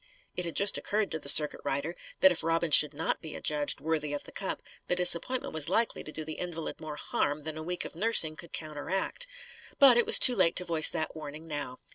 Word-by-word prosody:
It 180 - -4
had 170 - -7
just 200 0 +2
occurred 210 0 -4
to 160 - -5
the 140 - +2
circuit 150 0 +3
rider 145 +5 -4 0.3
that 190 - +5
if 175 - -3
Robin 165 0 -2
should 150 0 +9
not 160 - -3
be 155 - -10
adjudged 150 -1 -2
worthy 155 -2 -4
of 145 - -6
the - - -15
cup, - - -6 0.2
the 180 - -1
disappointment 180 +8 0
was 155 -1 -1
likely 225 +5 -1
to 155 - -11
do 155 0 -8
the 155 0 -9
invalid 170 -2 -7
more 155 -1 -8
harm 145 0 -4
than 155 0 -7
a 155 - -8
week 180 +2 -6
of - - -10
nursing 170 -4 +3
could 170 +1 -14
counteract. 160 - -4 0.5
But 265 -4 +5
it 240 - +1
was - - +9
too 250 - +7
late 185 -5 +1
to 180 - 0
voice 165 -3 +7
that 155 - -5
warning 155 0 -11
now. 145 -5 -7
160 Hz, 230 wpm, -27 LUFS, 150-180 Hz, 0.5 s, should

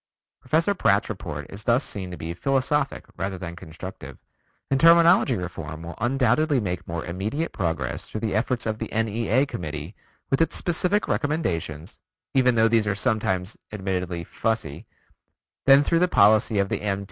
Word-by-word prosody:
Professor 160 +9 +1
Pratt's 100 - +2
report 80 -9 -5
is 100 +1 -8
thus 120 +4 +3
seen 95 -4 -3
to 90 - -7
be 80 +2 -5
philosophic 135 - 0
rather 95 0 -3
than 85 -2 -7
constructive, 80 -5 -9 0.5
and 135 - +3
terminology 170 -4 +6
reform 80 -4 -6
will 85 +1 -7
undoubtedly 130 +4 +2
make 90 -5 -4
more 85 -1 -4
immediate 105 - -3
progress 85 -3 -3
through 110 - -6
the 110 -2 -1
efforts 120 +3 0
of 110 -1 -2
the - - -5
N.E.A. 115 +3 +1
Committee 80 - -6 0.4
with 135 - +2
its 165 - +1
specific 180 +4 +1
recommendations 85 - -2 0.3
(even 125 -2 +4
though 110 0 +5
these 115 -2 +2
are 100 - +1
sometimes 100 -3 -1
admittedly 90 -4 -3
fussy) 110 -7 -3 0.8
than 140 +1 +8
through 165 +3 +2
the 180 - +3
policy 110 - +4
of 100 -1 +1
the - - -2
M. 100 -1 -1
110 Hz, 160 wpm, -24 LUFS, 90-135 Hz, 0.8 s, than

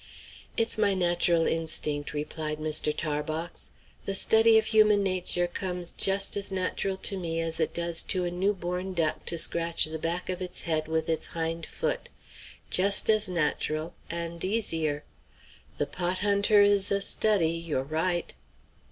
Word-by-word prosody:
"It's 230 -1 0
my 200 -2 +2
natural 175 -2 +2
instinct," 150 -3 -1
replied 150 +1 -4
Mr. 155 0 0
Tarbox. 155 +2 -4 0.4
"The 195 - +2
study 225 +3 +5
of 220 - +2
human 215 -2 +4
nature 180 -2 +1
comes 180 0 -2
just 195 0 +2
as 200 -1 -2
natural 190 +1 -2
to 200 - +5
me 165 -3 -2
as 165 0 0
it 160 - -1
does 170 -1 +4
to 185 -2 +1
a 175 - -3
new 195 +4 0
born 180 +1 -5
duck 160 -2 -1
to 170 - -2
scratch 165 0 +2
the 160 0 -6
back 170 +3 -3
of 185 0 -3
its 180 -1 -3
head 155 -2 -1
with 160 0 -2
its 160 -1 -2
hind 165 0 -4
foot; - - -4 0.6
just 200 +3 +5
as 215 -2 +2
natural 155 -1 -2 0.2
and 170 0 -4
easier. 165 -8 0 0.7
The - - 0
pot 180 +1 -2
hunter 205 +1 +4
is 205 -1 +3
a 200 - +2
study; 200 -4 +1
you're 165 -5 -3
right." 165 +4 -2
175 Hz, 160 wpm, -27 LUFS, 160-195 Hz, 0.7 s, study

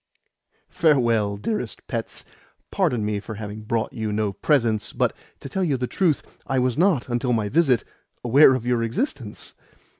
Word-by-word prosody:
"Farewell, 115 -9 +2
dearest 210 - -4
pets. - - -5 0.5
Pardon 140 - +1
me 105 -1 -1
for 110 +2 -8
having 105 0 -7
brought 110 +1 -2
you 110 -1 -3
no 105 -1 -1
presents, 115 -2 +1
but, - - 0 0.3
to - - -7
tell 190 +8 -2
you 145 -7 +1
the 125 - -1
truth, 160 +2 +1 0.2
I 135 - 0
was 125 -1 +1
not, 170 -7 +2
until 125 0 0
my 110 -3 0
visit, 140 -6 +3 0.4
aware 130 +3 +6
of 125 -2 -4
your 120 -1 +1
existence. 115 - -3
120 Hz, 160 wpm, -23 LUFS, 110-140 Hz, 0.5 s, aware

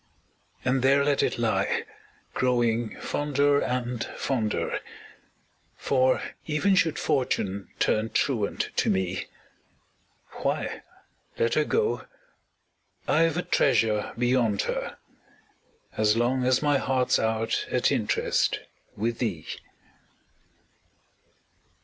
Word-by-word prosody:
And 130 +1 +2
there 140 +2 +4
let 145 -1 +2
it - - 0
lie, - - 0 0.5
growing 120 -3 0
fonder 145 0 +1
and, 125 -1 -2
fonder 115 -6 -1 1.0
For, 130 -1 +2 0.2
even 160 +6 +2
should 170 -5 +2
Fortune 100 -7 -1
turn 110 +1 +1
truant 110 -7 0
to - - +2
me, 95 0 -1 1.1
Why, - - -2 0.6
let 115 0 +1
her 155 - +2
go 445 -1 0 1.0
I've 165 +1 +3
a 180 - 0
treasure 110 -5 +2
beyond 120 -4 +2
her, - - -3 1.0
As 110 +1 +3
long 125 +2 +1
as 130 +3 +3
my 145 -2 +3
heart's 130 -1 +1
out 110 0 0
at - - +2
interest - - +1 0.4
With 115 +2 -1
thee! 90 -10 -2
125 Hz, 100 wpm, -26 LUFS, 110-140 Hz, 1.1 s, there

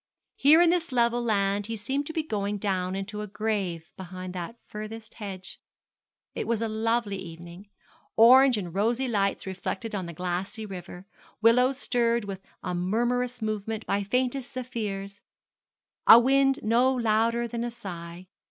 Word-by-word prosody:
Here 310 +5 +6
in 340 - +5
this 345 -3 0
level 240 -1 +2
land 200 -3 +1
he 225 0 -4
seemed 270 +7 -2
to - - -4
be 320 -1 -1
going 205 -7 -2
down 190 -2 -1
into 210 +2 -5
a 210 - -5
grave 195 -6 -3
behind 185 0 -7
that 185 +6 -6
furthest 215 +1 -8
hedge. 190 -3 -8 0.7
It - - -4
was 230 -1 +1
a 225 - -1
lovely 220 -2 0
evening 175 +2 -10 0.5
orange 255 +2 +7
and 180 -5 -5
rosy 230 +7 +1
lights 200 -4 0
reflected 190 +3 -4
on 190 -4 -3
the 170 - -7
glassy 185 +6 -3
river, 180 -2 -9 0.3
willows 250 +4 +4
stirred 235 -4 +1
with 195 -1 -6 0.2
a 180 - -2
murmurous 240 +6 -1
movement 215 +1 -3
by 200 - 0
faintest 250 +5 -1
zephyrs 210 -6 -5 0.9
a 225 - +12
wind 270 +3 +3
no 240 +4 +3
louder 230 0 +1
than 235 0 -4
a 240 - -2
sigh. 180 -6 -8
215 Hz, 155 wpm, -27 LUFS, 195-240 Hz, 0.9 s, a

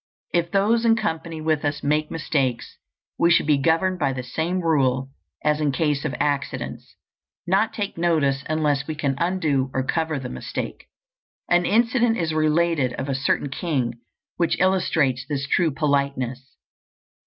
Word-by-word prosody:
If 170 -1 +1
those 210 +5 +2
in 230 -1 +5
company 160 -5 -3
with 155 -1 0
us 145 0 -2
make 150 +1 +1
mistakes, 135 -6 -2 0.4
we 170 - +4
should 170 - +4
be 150 -2 +3
governed 175 +5 +1
by 140 -3 +1
the 130 -1 -4
same 160 +9 -2
rule 135 -5 +1 0.3
as 150 0 +1
in 150 -2 +2
case 145 0 0
of 150 - -2
accidents, 145 -1 -3 0.5
not 195 +5 +2
take 200 -5 -4
notice 145 -5 +1
unless 150 -3 0
we 155 - -3
can 140 -2 0
undo 160 -7 +1
or 130 - +1
cover 160 +1 -1
the 130 - -5
mistake. 65 0 -6 0.6
An 175 0 +4
incident 235 +1 +3
is 165 -2 -1
related 155 -3 +2
of 135 +3 -4
a - - 0
certain 140 +1 0
king 130 -8 -2 0.4
which 170 -1 +1
illustrates 160 -9 +2
this 140 -1 -2
true 170 +3 +2
politeness. 140 -3 -1
155 Hz, 155 wpm, -23 LUFS, 140-170 Hz, 0.6 s, in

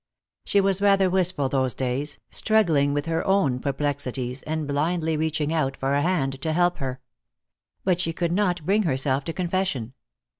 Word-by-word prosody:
She 200 - +3
was 195 -1 +1
rather 195 -2 +4
wistful 180 -6 +1
those 130 -3 0
days, 135 +3 -1
struggling 165 -11 +2
with 145 0 -1
her 165 0 -1
own 160 -11 +2
perplexities, 135 -2 -2
and 155 -1 -3
blindly 160 +3 0
reaching 155 0 -1
out 135 -4 0
for 135 +1 -1
a 140 - +2
hand 140 -6 0
to 160 +1 -1
help 175 +1 +2
her. 130 -2 -4 0.8
But 180 -2 +1
she 165 -2 0
could 170 +1 -2
not 180 -4 0
bring 200 +4 +3
herself 135 -5 0
to 165 - -3
confession. 175 -10 -2
155 Hz, 165 wpm, -24 LUFS, 135-180 Hz, 0.8 s, rather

